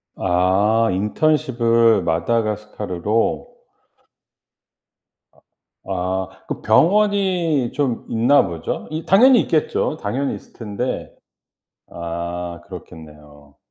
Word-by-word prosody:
아. 95 +5 +2
인턴십을 115 0 +2
마다가스카르로. 105 +2 -1 2.4
아 95 - -2
아. 95 +1 -4
그 - - -4
병원이 185 - +2
좀 130 -3 -2
있나 120 +2 +3
보죠? 85 -3 -5
이 155 +1 -4
당연히 245 +5 +6
있겠죠. 155 0 -1
당연히 130 +7 -2
있을 - - -16
텐데. 115 +2 -5 0.8
아. 85 0 -5
그렇겠네요. 75 -2 -13
110 Hz, 190 characters per minute, -20 LUFS, 90-140 Hz, 2.4 s, 당연히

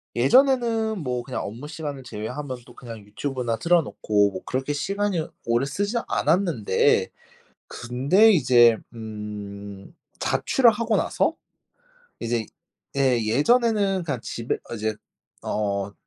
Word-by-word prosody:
예전에는 225 - +3
뭐 125 -2 -2
그냥 125 +1 -5
업무시간을 145 +5 -6
제외하면 125 +4 -5
또 120 - -15
그냥 115 -2 -9
유튜브나 120 +2 -3
틀어놓고 110 -12 +2
뭐 95 -1 -7
그렇게 130 +3 -2
시간을 195 +1 -1 0.2
오래 120 +3 +1
쓰지 200 - -2
않았는데. 165 - +2 0.6
근데 140 - +3
이제 120 - +5 0.2
음 105 -3 -8 0.3
자취를 250 -3 +3
하고 225 0 0
나서 - - +1 0.9
이제 115 -1 -1 0.5
예, 130 -3 +2
예전에는 200 - +2
그냥 140 -8 -3
집에 115 0 -3
어 - - -4
이제 110 0 -2 0.5
어 100 -1 -2
130 Hz, 260 characters per minute, -24 LUFS, 110-185 Hz, 0.9 s, 이제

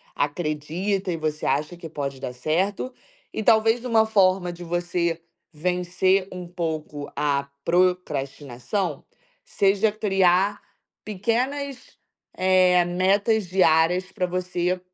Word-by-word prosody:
acredita 160 +6 -2
e - - -1
você 155 -1 -3
acha 155 +5 -1
que 170 -1 -8
pode 140 -3 -4
dar 125 -2 -5
certo. 185 - -1 0.4
E - - -2
talvez 225 +3 +3
uma 225 -3 +4
forma 185 -4 +2
de 175 0 -11
você 170 -1 -1 0.3
vencer 180 +3 +1
um 180 -1 -7
pouco 160 -4 -4
a 140 -1 0 0.2
procrastinação 155 -3 -1 0.4
seja 200 +2 +2
criar 195 -1 +2 0.4
pequenas, 250 +6 -2 0.4
eh, 185 -1 +4
metas 195 +4 +1
diárias 180 0 +3
pra 190 -2 -1
você 180 0 -1
180 Hz, 110 wpm, -24 LUFS, 160-195 Hz, 0.4 s, uma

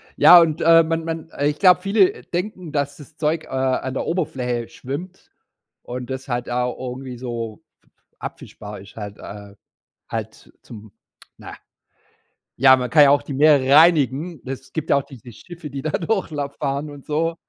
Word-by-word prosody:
Ja, 175 0 +9
und, 160 0 0
äh, 165 0 +6
man 165 0 -2
man 165 0 -5
ich 145 +1 +1
glaube, 180 -2 +5
viele 365 - +2
denken, 180 -2 -5
dass 145 -1 -2
das 150 +1 -15
Zeug, 155 +1 -1
äh, - - -18
an 130 0 -1
der - - -2
Oberfläche 130 -9 -2
schwimmt 175 +8 -8 0.5
und 125 +1 -7
das 130 +1 -6
halt 120 -1 -3
da 125 0 -1
irgendwie 125 0 -7
so 115 -3 -6 0.2
f - - -34
f - - -49 0.3
abfischbar 105 0 -9
ist 100 - -15
halt, 105 -2 -8
äh. 100 0 -10 0.5
Halt - - -7
zum, 110 -2 -12 0.5
na - - -10 1.0
ja, 130 0 +7
man 125 -1 -3
kann 150 -2 +6
ja 140 - +6
auch 145 - +3
die 145 - -6
Meere 140 -2 +5
reinigen. 155 -1 +3
Es 130 0 -8
gibt 160 -1 -4
ja - - +6
auch 140 - -1
diese 125 -3 -13
Schiffe, 170 - -11
die 135 0 -6
da 155 - -2
Durchlauf 155 -8 -2
fahren 140 +1 -2
und 145 -2 -13
so. 165 +2 -1
145 Hz, 180 wpm, -21 LUFS, 125-165 Hz, 1.0 s, Ja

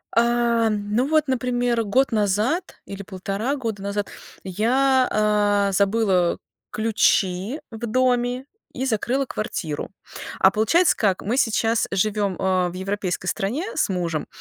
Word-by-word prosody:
Э, 235 -1 +2
ну 210 +4 -1
вот, 310 0 +2
например, 245 -2 0
год 255 +6 +1
назад, 220 - 0
или 200 0 -7
полтора 200 +7 -3
года 225 -7 -4
назад, 200 0 -3 0.3
я, 255 +7 +2
а, 205 -1 +2
забыла 195 -3 +2 0.3
ключи 210 - +1
в 225 +1 -5
доме 250 +1 +1 0.3
и 260 - -3
закрыла 260 +3 0
квартиру. 165 - -4 0.5
А 190 - +6
получается 265 - +3
как, 195 -4 +1
мы 230 +5 -1
сейчас 225 -2 +1
живем, 200 0 0
э, 185 -2 +1
в - - -10
европейской 190 -1 -3
стране 235 - -2
с - - +1
мужем 170 -5 -2
215 Hz, 130 wpm, -23 LUFS, 195-245 Hz, 0.5 s, А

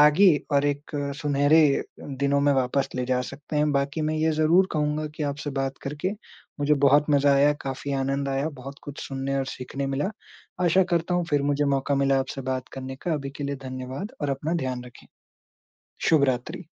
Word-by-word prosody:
आगे 150 +7 +7 0.2
और 140 0 +3
एक 145 +1 -2 0.3
सुनहरे 145 +2 +4
अ, - - -1 0.2
दिनों 140 +1 0
में 145 0 +4
वापस 135 +1 +1
ले 125 0 -1
जा 125 0 +1
सकते 150 +1 -6
हैं। 150 0 +3
बाकी 140 +2 0
मैं - - -1
ये 160 +1 +2
ज़रूर 160 +5 +4
कहूँगा 150 0 0
कि 155 - -4
आपसे 145 +1 -5
बात 135 0 -3
करके 150 +7 -3 0.5
मुझे 145 +1 +4
बहुत 145 +2 +6
मज़ा 140 -1 +4
आया, 145 +2 +5
काफ़ी 135 +1 -4
आनंद 135 +1 -1
आया, 135 +3 0
बहुत 140 -1 -9
कुछ 145 -1 -8
सुनने 135 0 -2
और 135 - 0
सीखने 135 +2 -5
मिला, 135 +7 -1 0.5
आशा 180 +2 +5
करता 170 +1 +1
हूँ 175 0 +1
फिर 145 -1 +2
मुझे 145 +1 +1
मौका 140 0 +1
मिला 135 0 +3
आपसे 135 +1 -5
बात 130 0 -4
करने 130 0 -6
का, 170 +5 -3
अभी 140 -2 -4
के 145 - -4
लिए 140 0 -2
धन्यवाद 130 - -5
और 145 - -1
अपना 145 +5 -2
ध्यान 125 -1 -3
रखें। 120 -1 -14 1.0
शुभ 155 -4 +5
रात्रि। 130 +6 -2
140 Hz, 195 wpm, -25 LUFS, 135-150 Hz, 1.0 s, आगे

